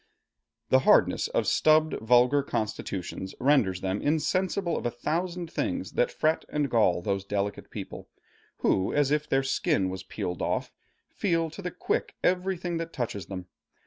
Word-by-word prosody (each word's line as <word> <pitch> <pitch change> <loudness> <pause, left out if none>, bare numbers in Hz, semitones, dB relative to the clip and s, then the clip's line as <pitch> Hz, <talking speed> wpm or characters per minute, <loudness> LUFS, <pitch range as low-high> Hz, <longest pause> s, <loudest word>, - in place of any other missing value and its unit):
The 130 - +6
hardness - - +4
of - - 0
stubbed 155 0 +4
vulgar 125 +5 +4
constitutions 95 -6 -4
renders 125 -10 +3
them 95 +2 -1
insensible 170 +4 0
of - - -3
a - - +1
thousand 170 +7 -3
things - - -2
that - - +1
fret 160 - +1
and 145 -3 -1
gall 95 -7 +3
those 100 0 -1
delicate 100 0 -3
people, - - -8 0.5
who, 95 - +2
as 145 -1 +2
if 150 0 0
their 135 0 +2
skin 95 -7 +1
was 95 0 -5
peeled 90 -2 -5
off, - - -1 0.4
feel 165 -5 0
to 195 - -8
the 180 - -3
quick 180 - -2
everything 180 -1 0
that 165 0 -5
touches 105 -7 -4
them. 90 -2 -6
140 Hz, 155 wpm, -27 LUFS, 100-165 Hz, 0.5 s, The